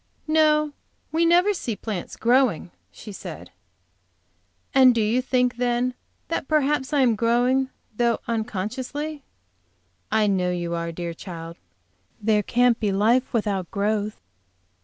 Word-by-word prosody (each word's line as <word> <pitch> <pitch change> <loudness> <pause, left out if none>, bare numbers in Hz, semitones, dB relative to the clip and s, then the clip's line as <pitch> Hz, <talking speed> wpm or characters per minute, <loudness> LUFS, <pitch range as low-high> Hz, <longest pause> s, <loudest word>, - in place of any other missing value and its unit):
"No, 305 -1 +3 0.4
we 330 +1 +2
never 355 +5 +4
see 240 - -3
plants 205 -4 -5
growing," 240 - +2 0.2
she 210 - -10
said. 90 - -9 1.2
"And 260 -2 +6
do - - +1
you 220 +2 +2
really - - +2
think 250 -1 +1
then, 245 +1 0 0.3
that 330 - -3
perhaps 295 -3 +1
I 290 -2 +3
am 240 -4 +4
growing, 245 +4 +2 0.3
though 235 0 +2
unconsciously?" 245 +7 -3 0.9
"I 215 0 +3
know 190 -3 +1
you 175 -1 -2
are, 170 0 -3
dear 170 0 -5
child. 165 -1 -8 0.6
There 210 0 +2
can't 245 +3 +2
be 210 -3 0
life 225 +6 +2
without 205 -6 -1
growth." 210 +1 -1
235 Hz, 135 wpm, -24 LUFS, 205-265 Hz, 1.2 s, And